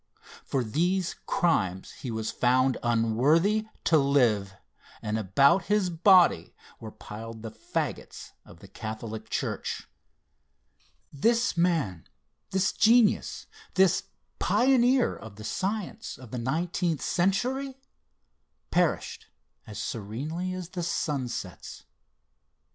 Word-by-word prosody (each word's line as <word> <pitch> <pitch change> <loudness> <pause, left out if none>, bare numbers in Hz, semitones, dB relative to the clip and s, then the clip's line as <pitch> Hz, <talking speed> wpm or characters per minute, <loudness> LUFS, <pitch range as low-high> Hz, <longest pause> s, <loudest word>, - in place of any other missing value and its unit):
For 135 -2 -1
these 175 - 0
crimes 95 - 0
he 130 - -8
was 110 -1 -3
found 130 +1 +2
unworthy 135 - +2 0.2
to 160 -2 +4
live, 120 -9 +2 0.4
and 105 -1 -3
about 140 - +3
his 205 -3 +1
body 180 +1 +4 0.2
were 110 - -8
piled 110 +1 -9
the 110 - -6
fagots - - -5
of - - -16
the - - -12
Catholic 110 0 -7
Church. - - -3 1.3
This 230 - +2
man, 165 - 0 0.4
this 190 0 +1
genius, 230 0 +3 0.3
this 190 -1 +3 0.3
pioneer 255 0 +3
of 110 -2 -11
the 105 - -10
science 195 - -3
of 125 -3 -13
the 125 - -3
nineteenth 160 +3 -1
century, 255 +9 0 0.9
perished - - 0 0.4
as 105 -1 -8
serenely 130 - -4
as 185 -2 -6
the 180 -1 -5
sun 150 -6 -1
sets. 90 -7 -7
150 Hz, 110 wpm, -27 LUFS, 110-185 Hz, 1.3 s, to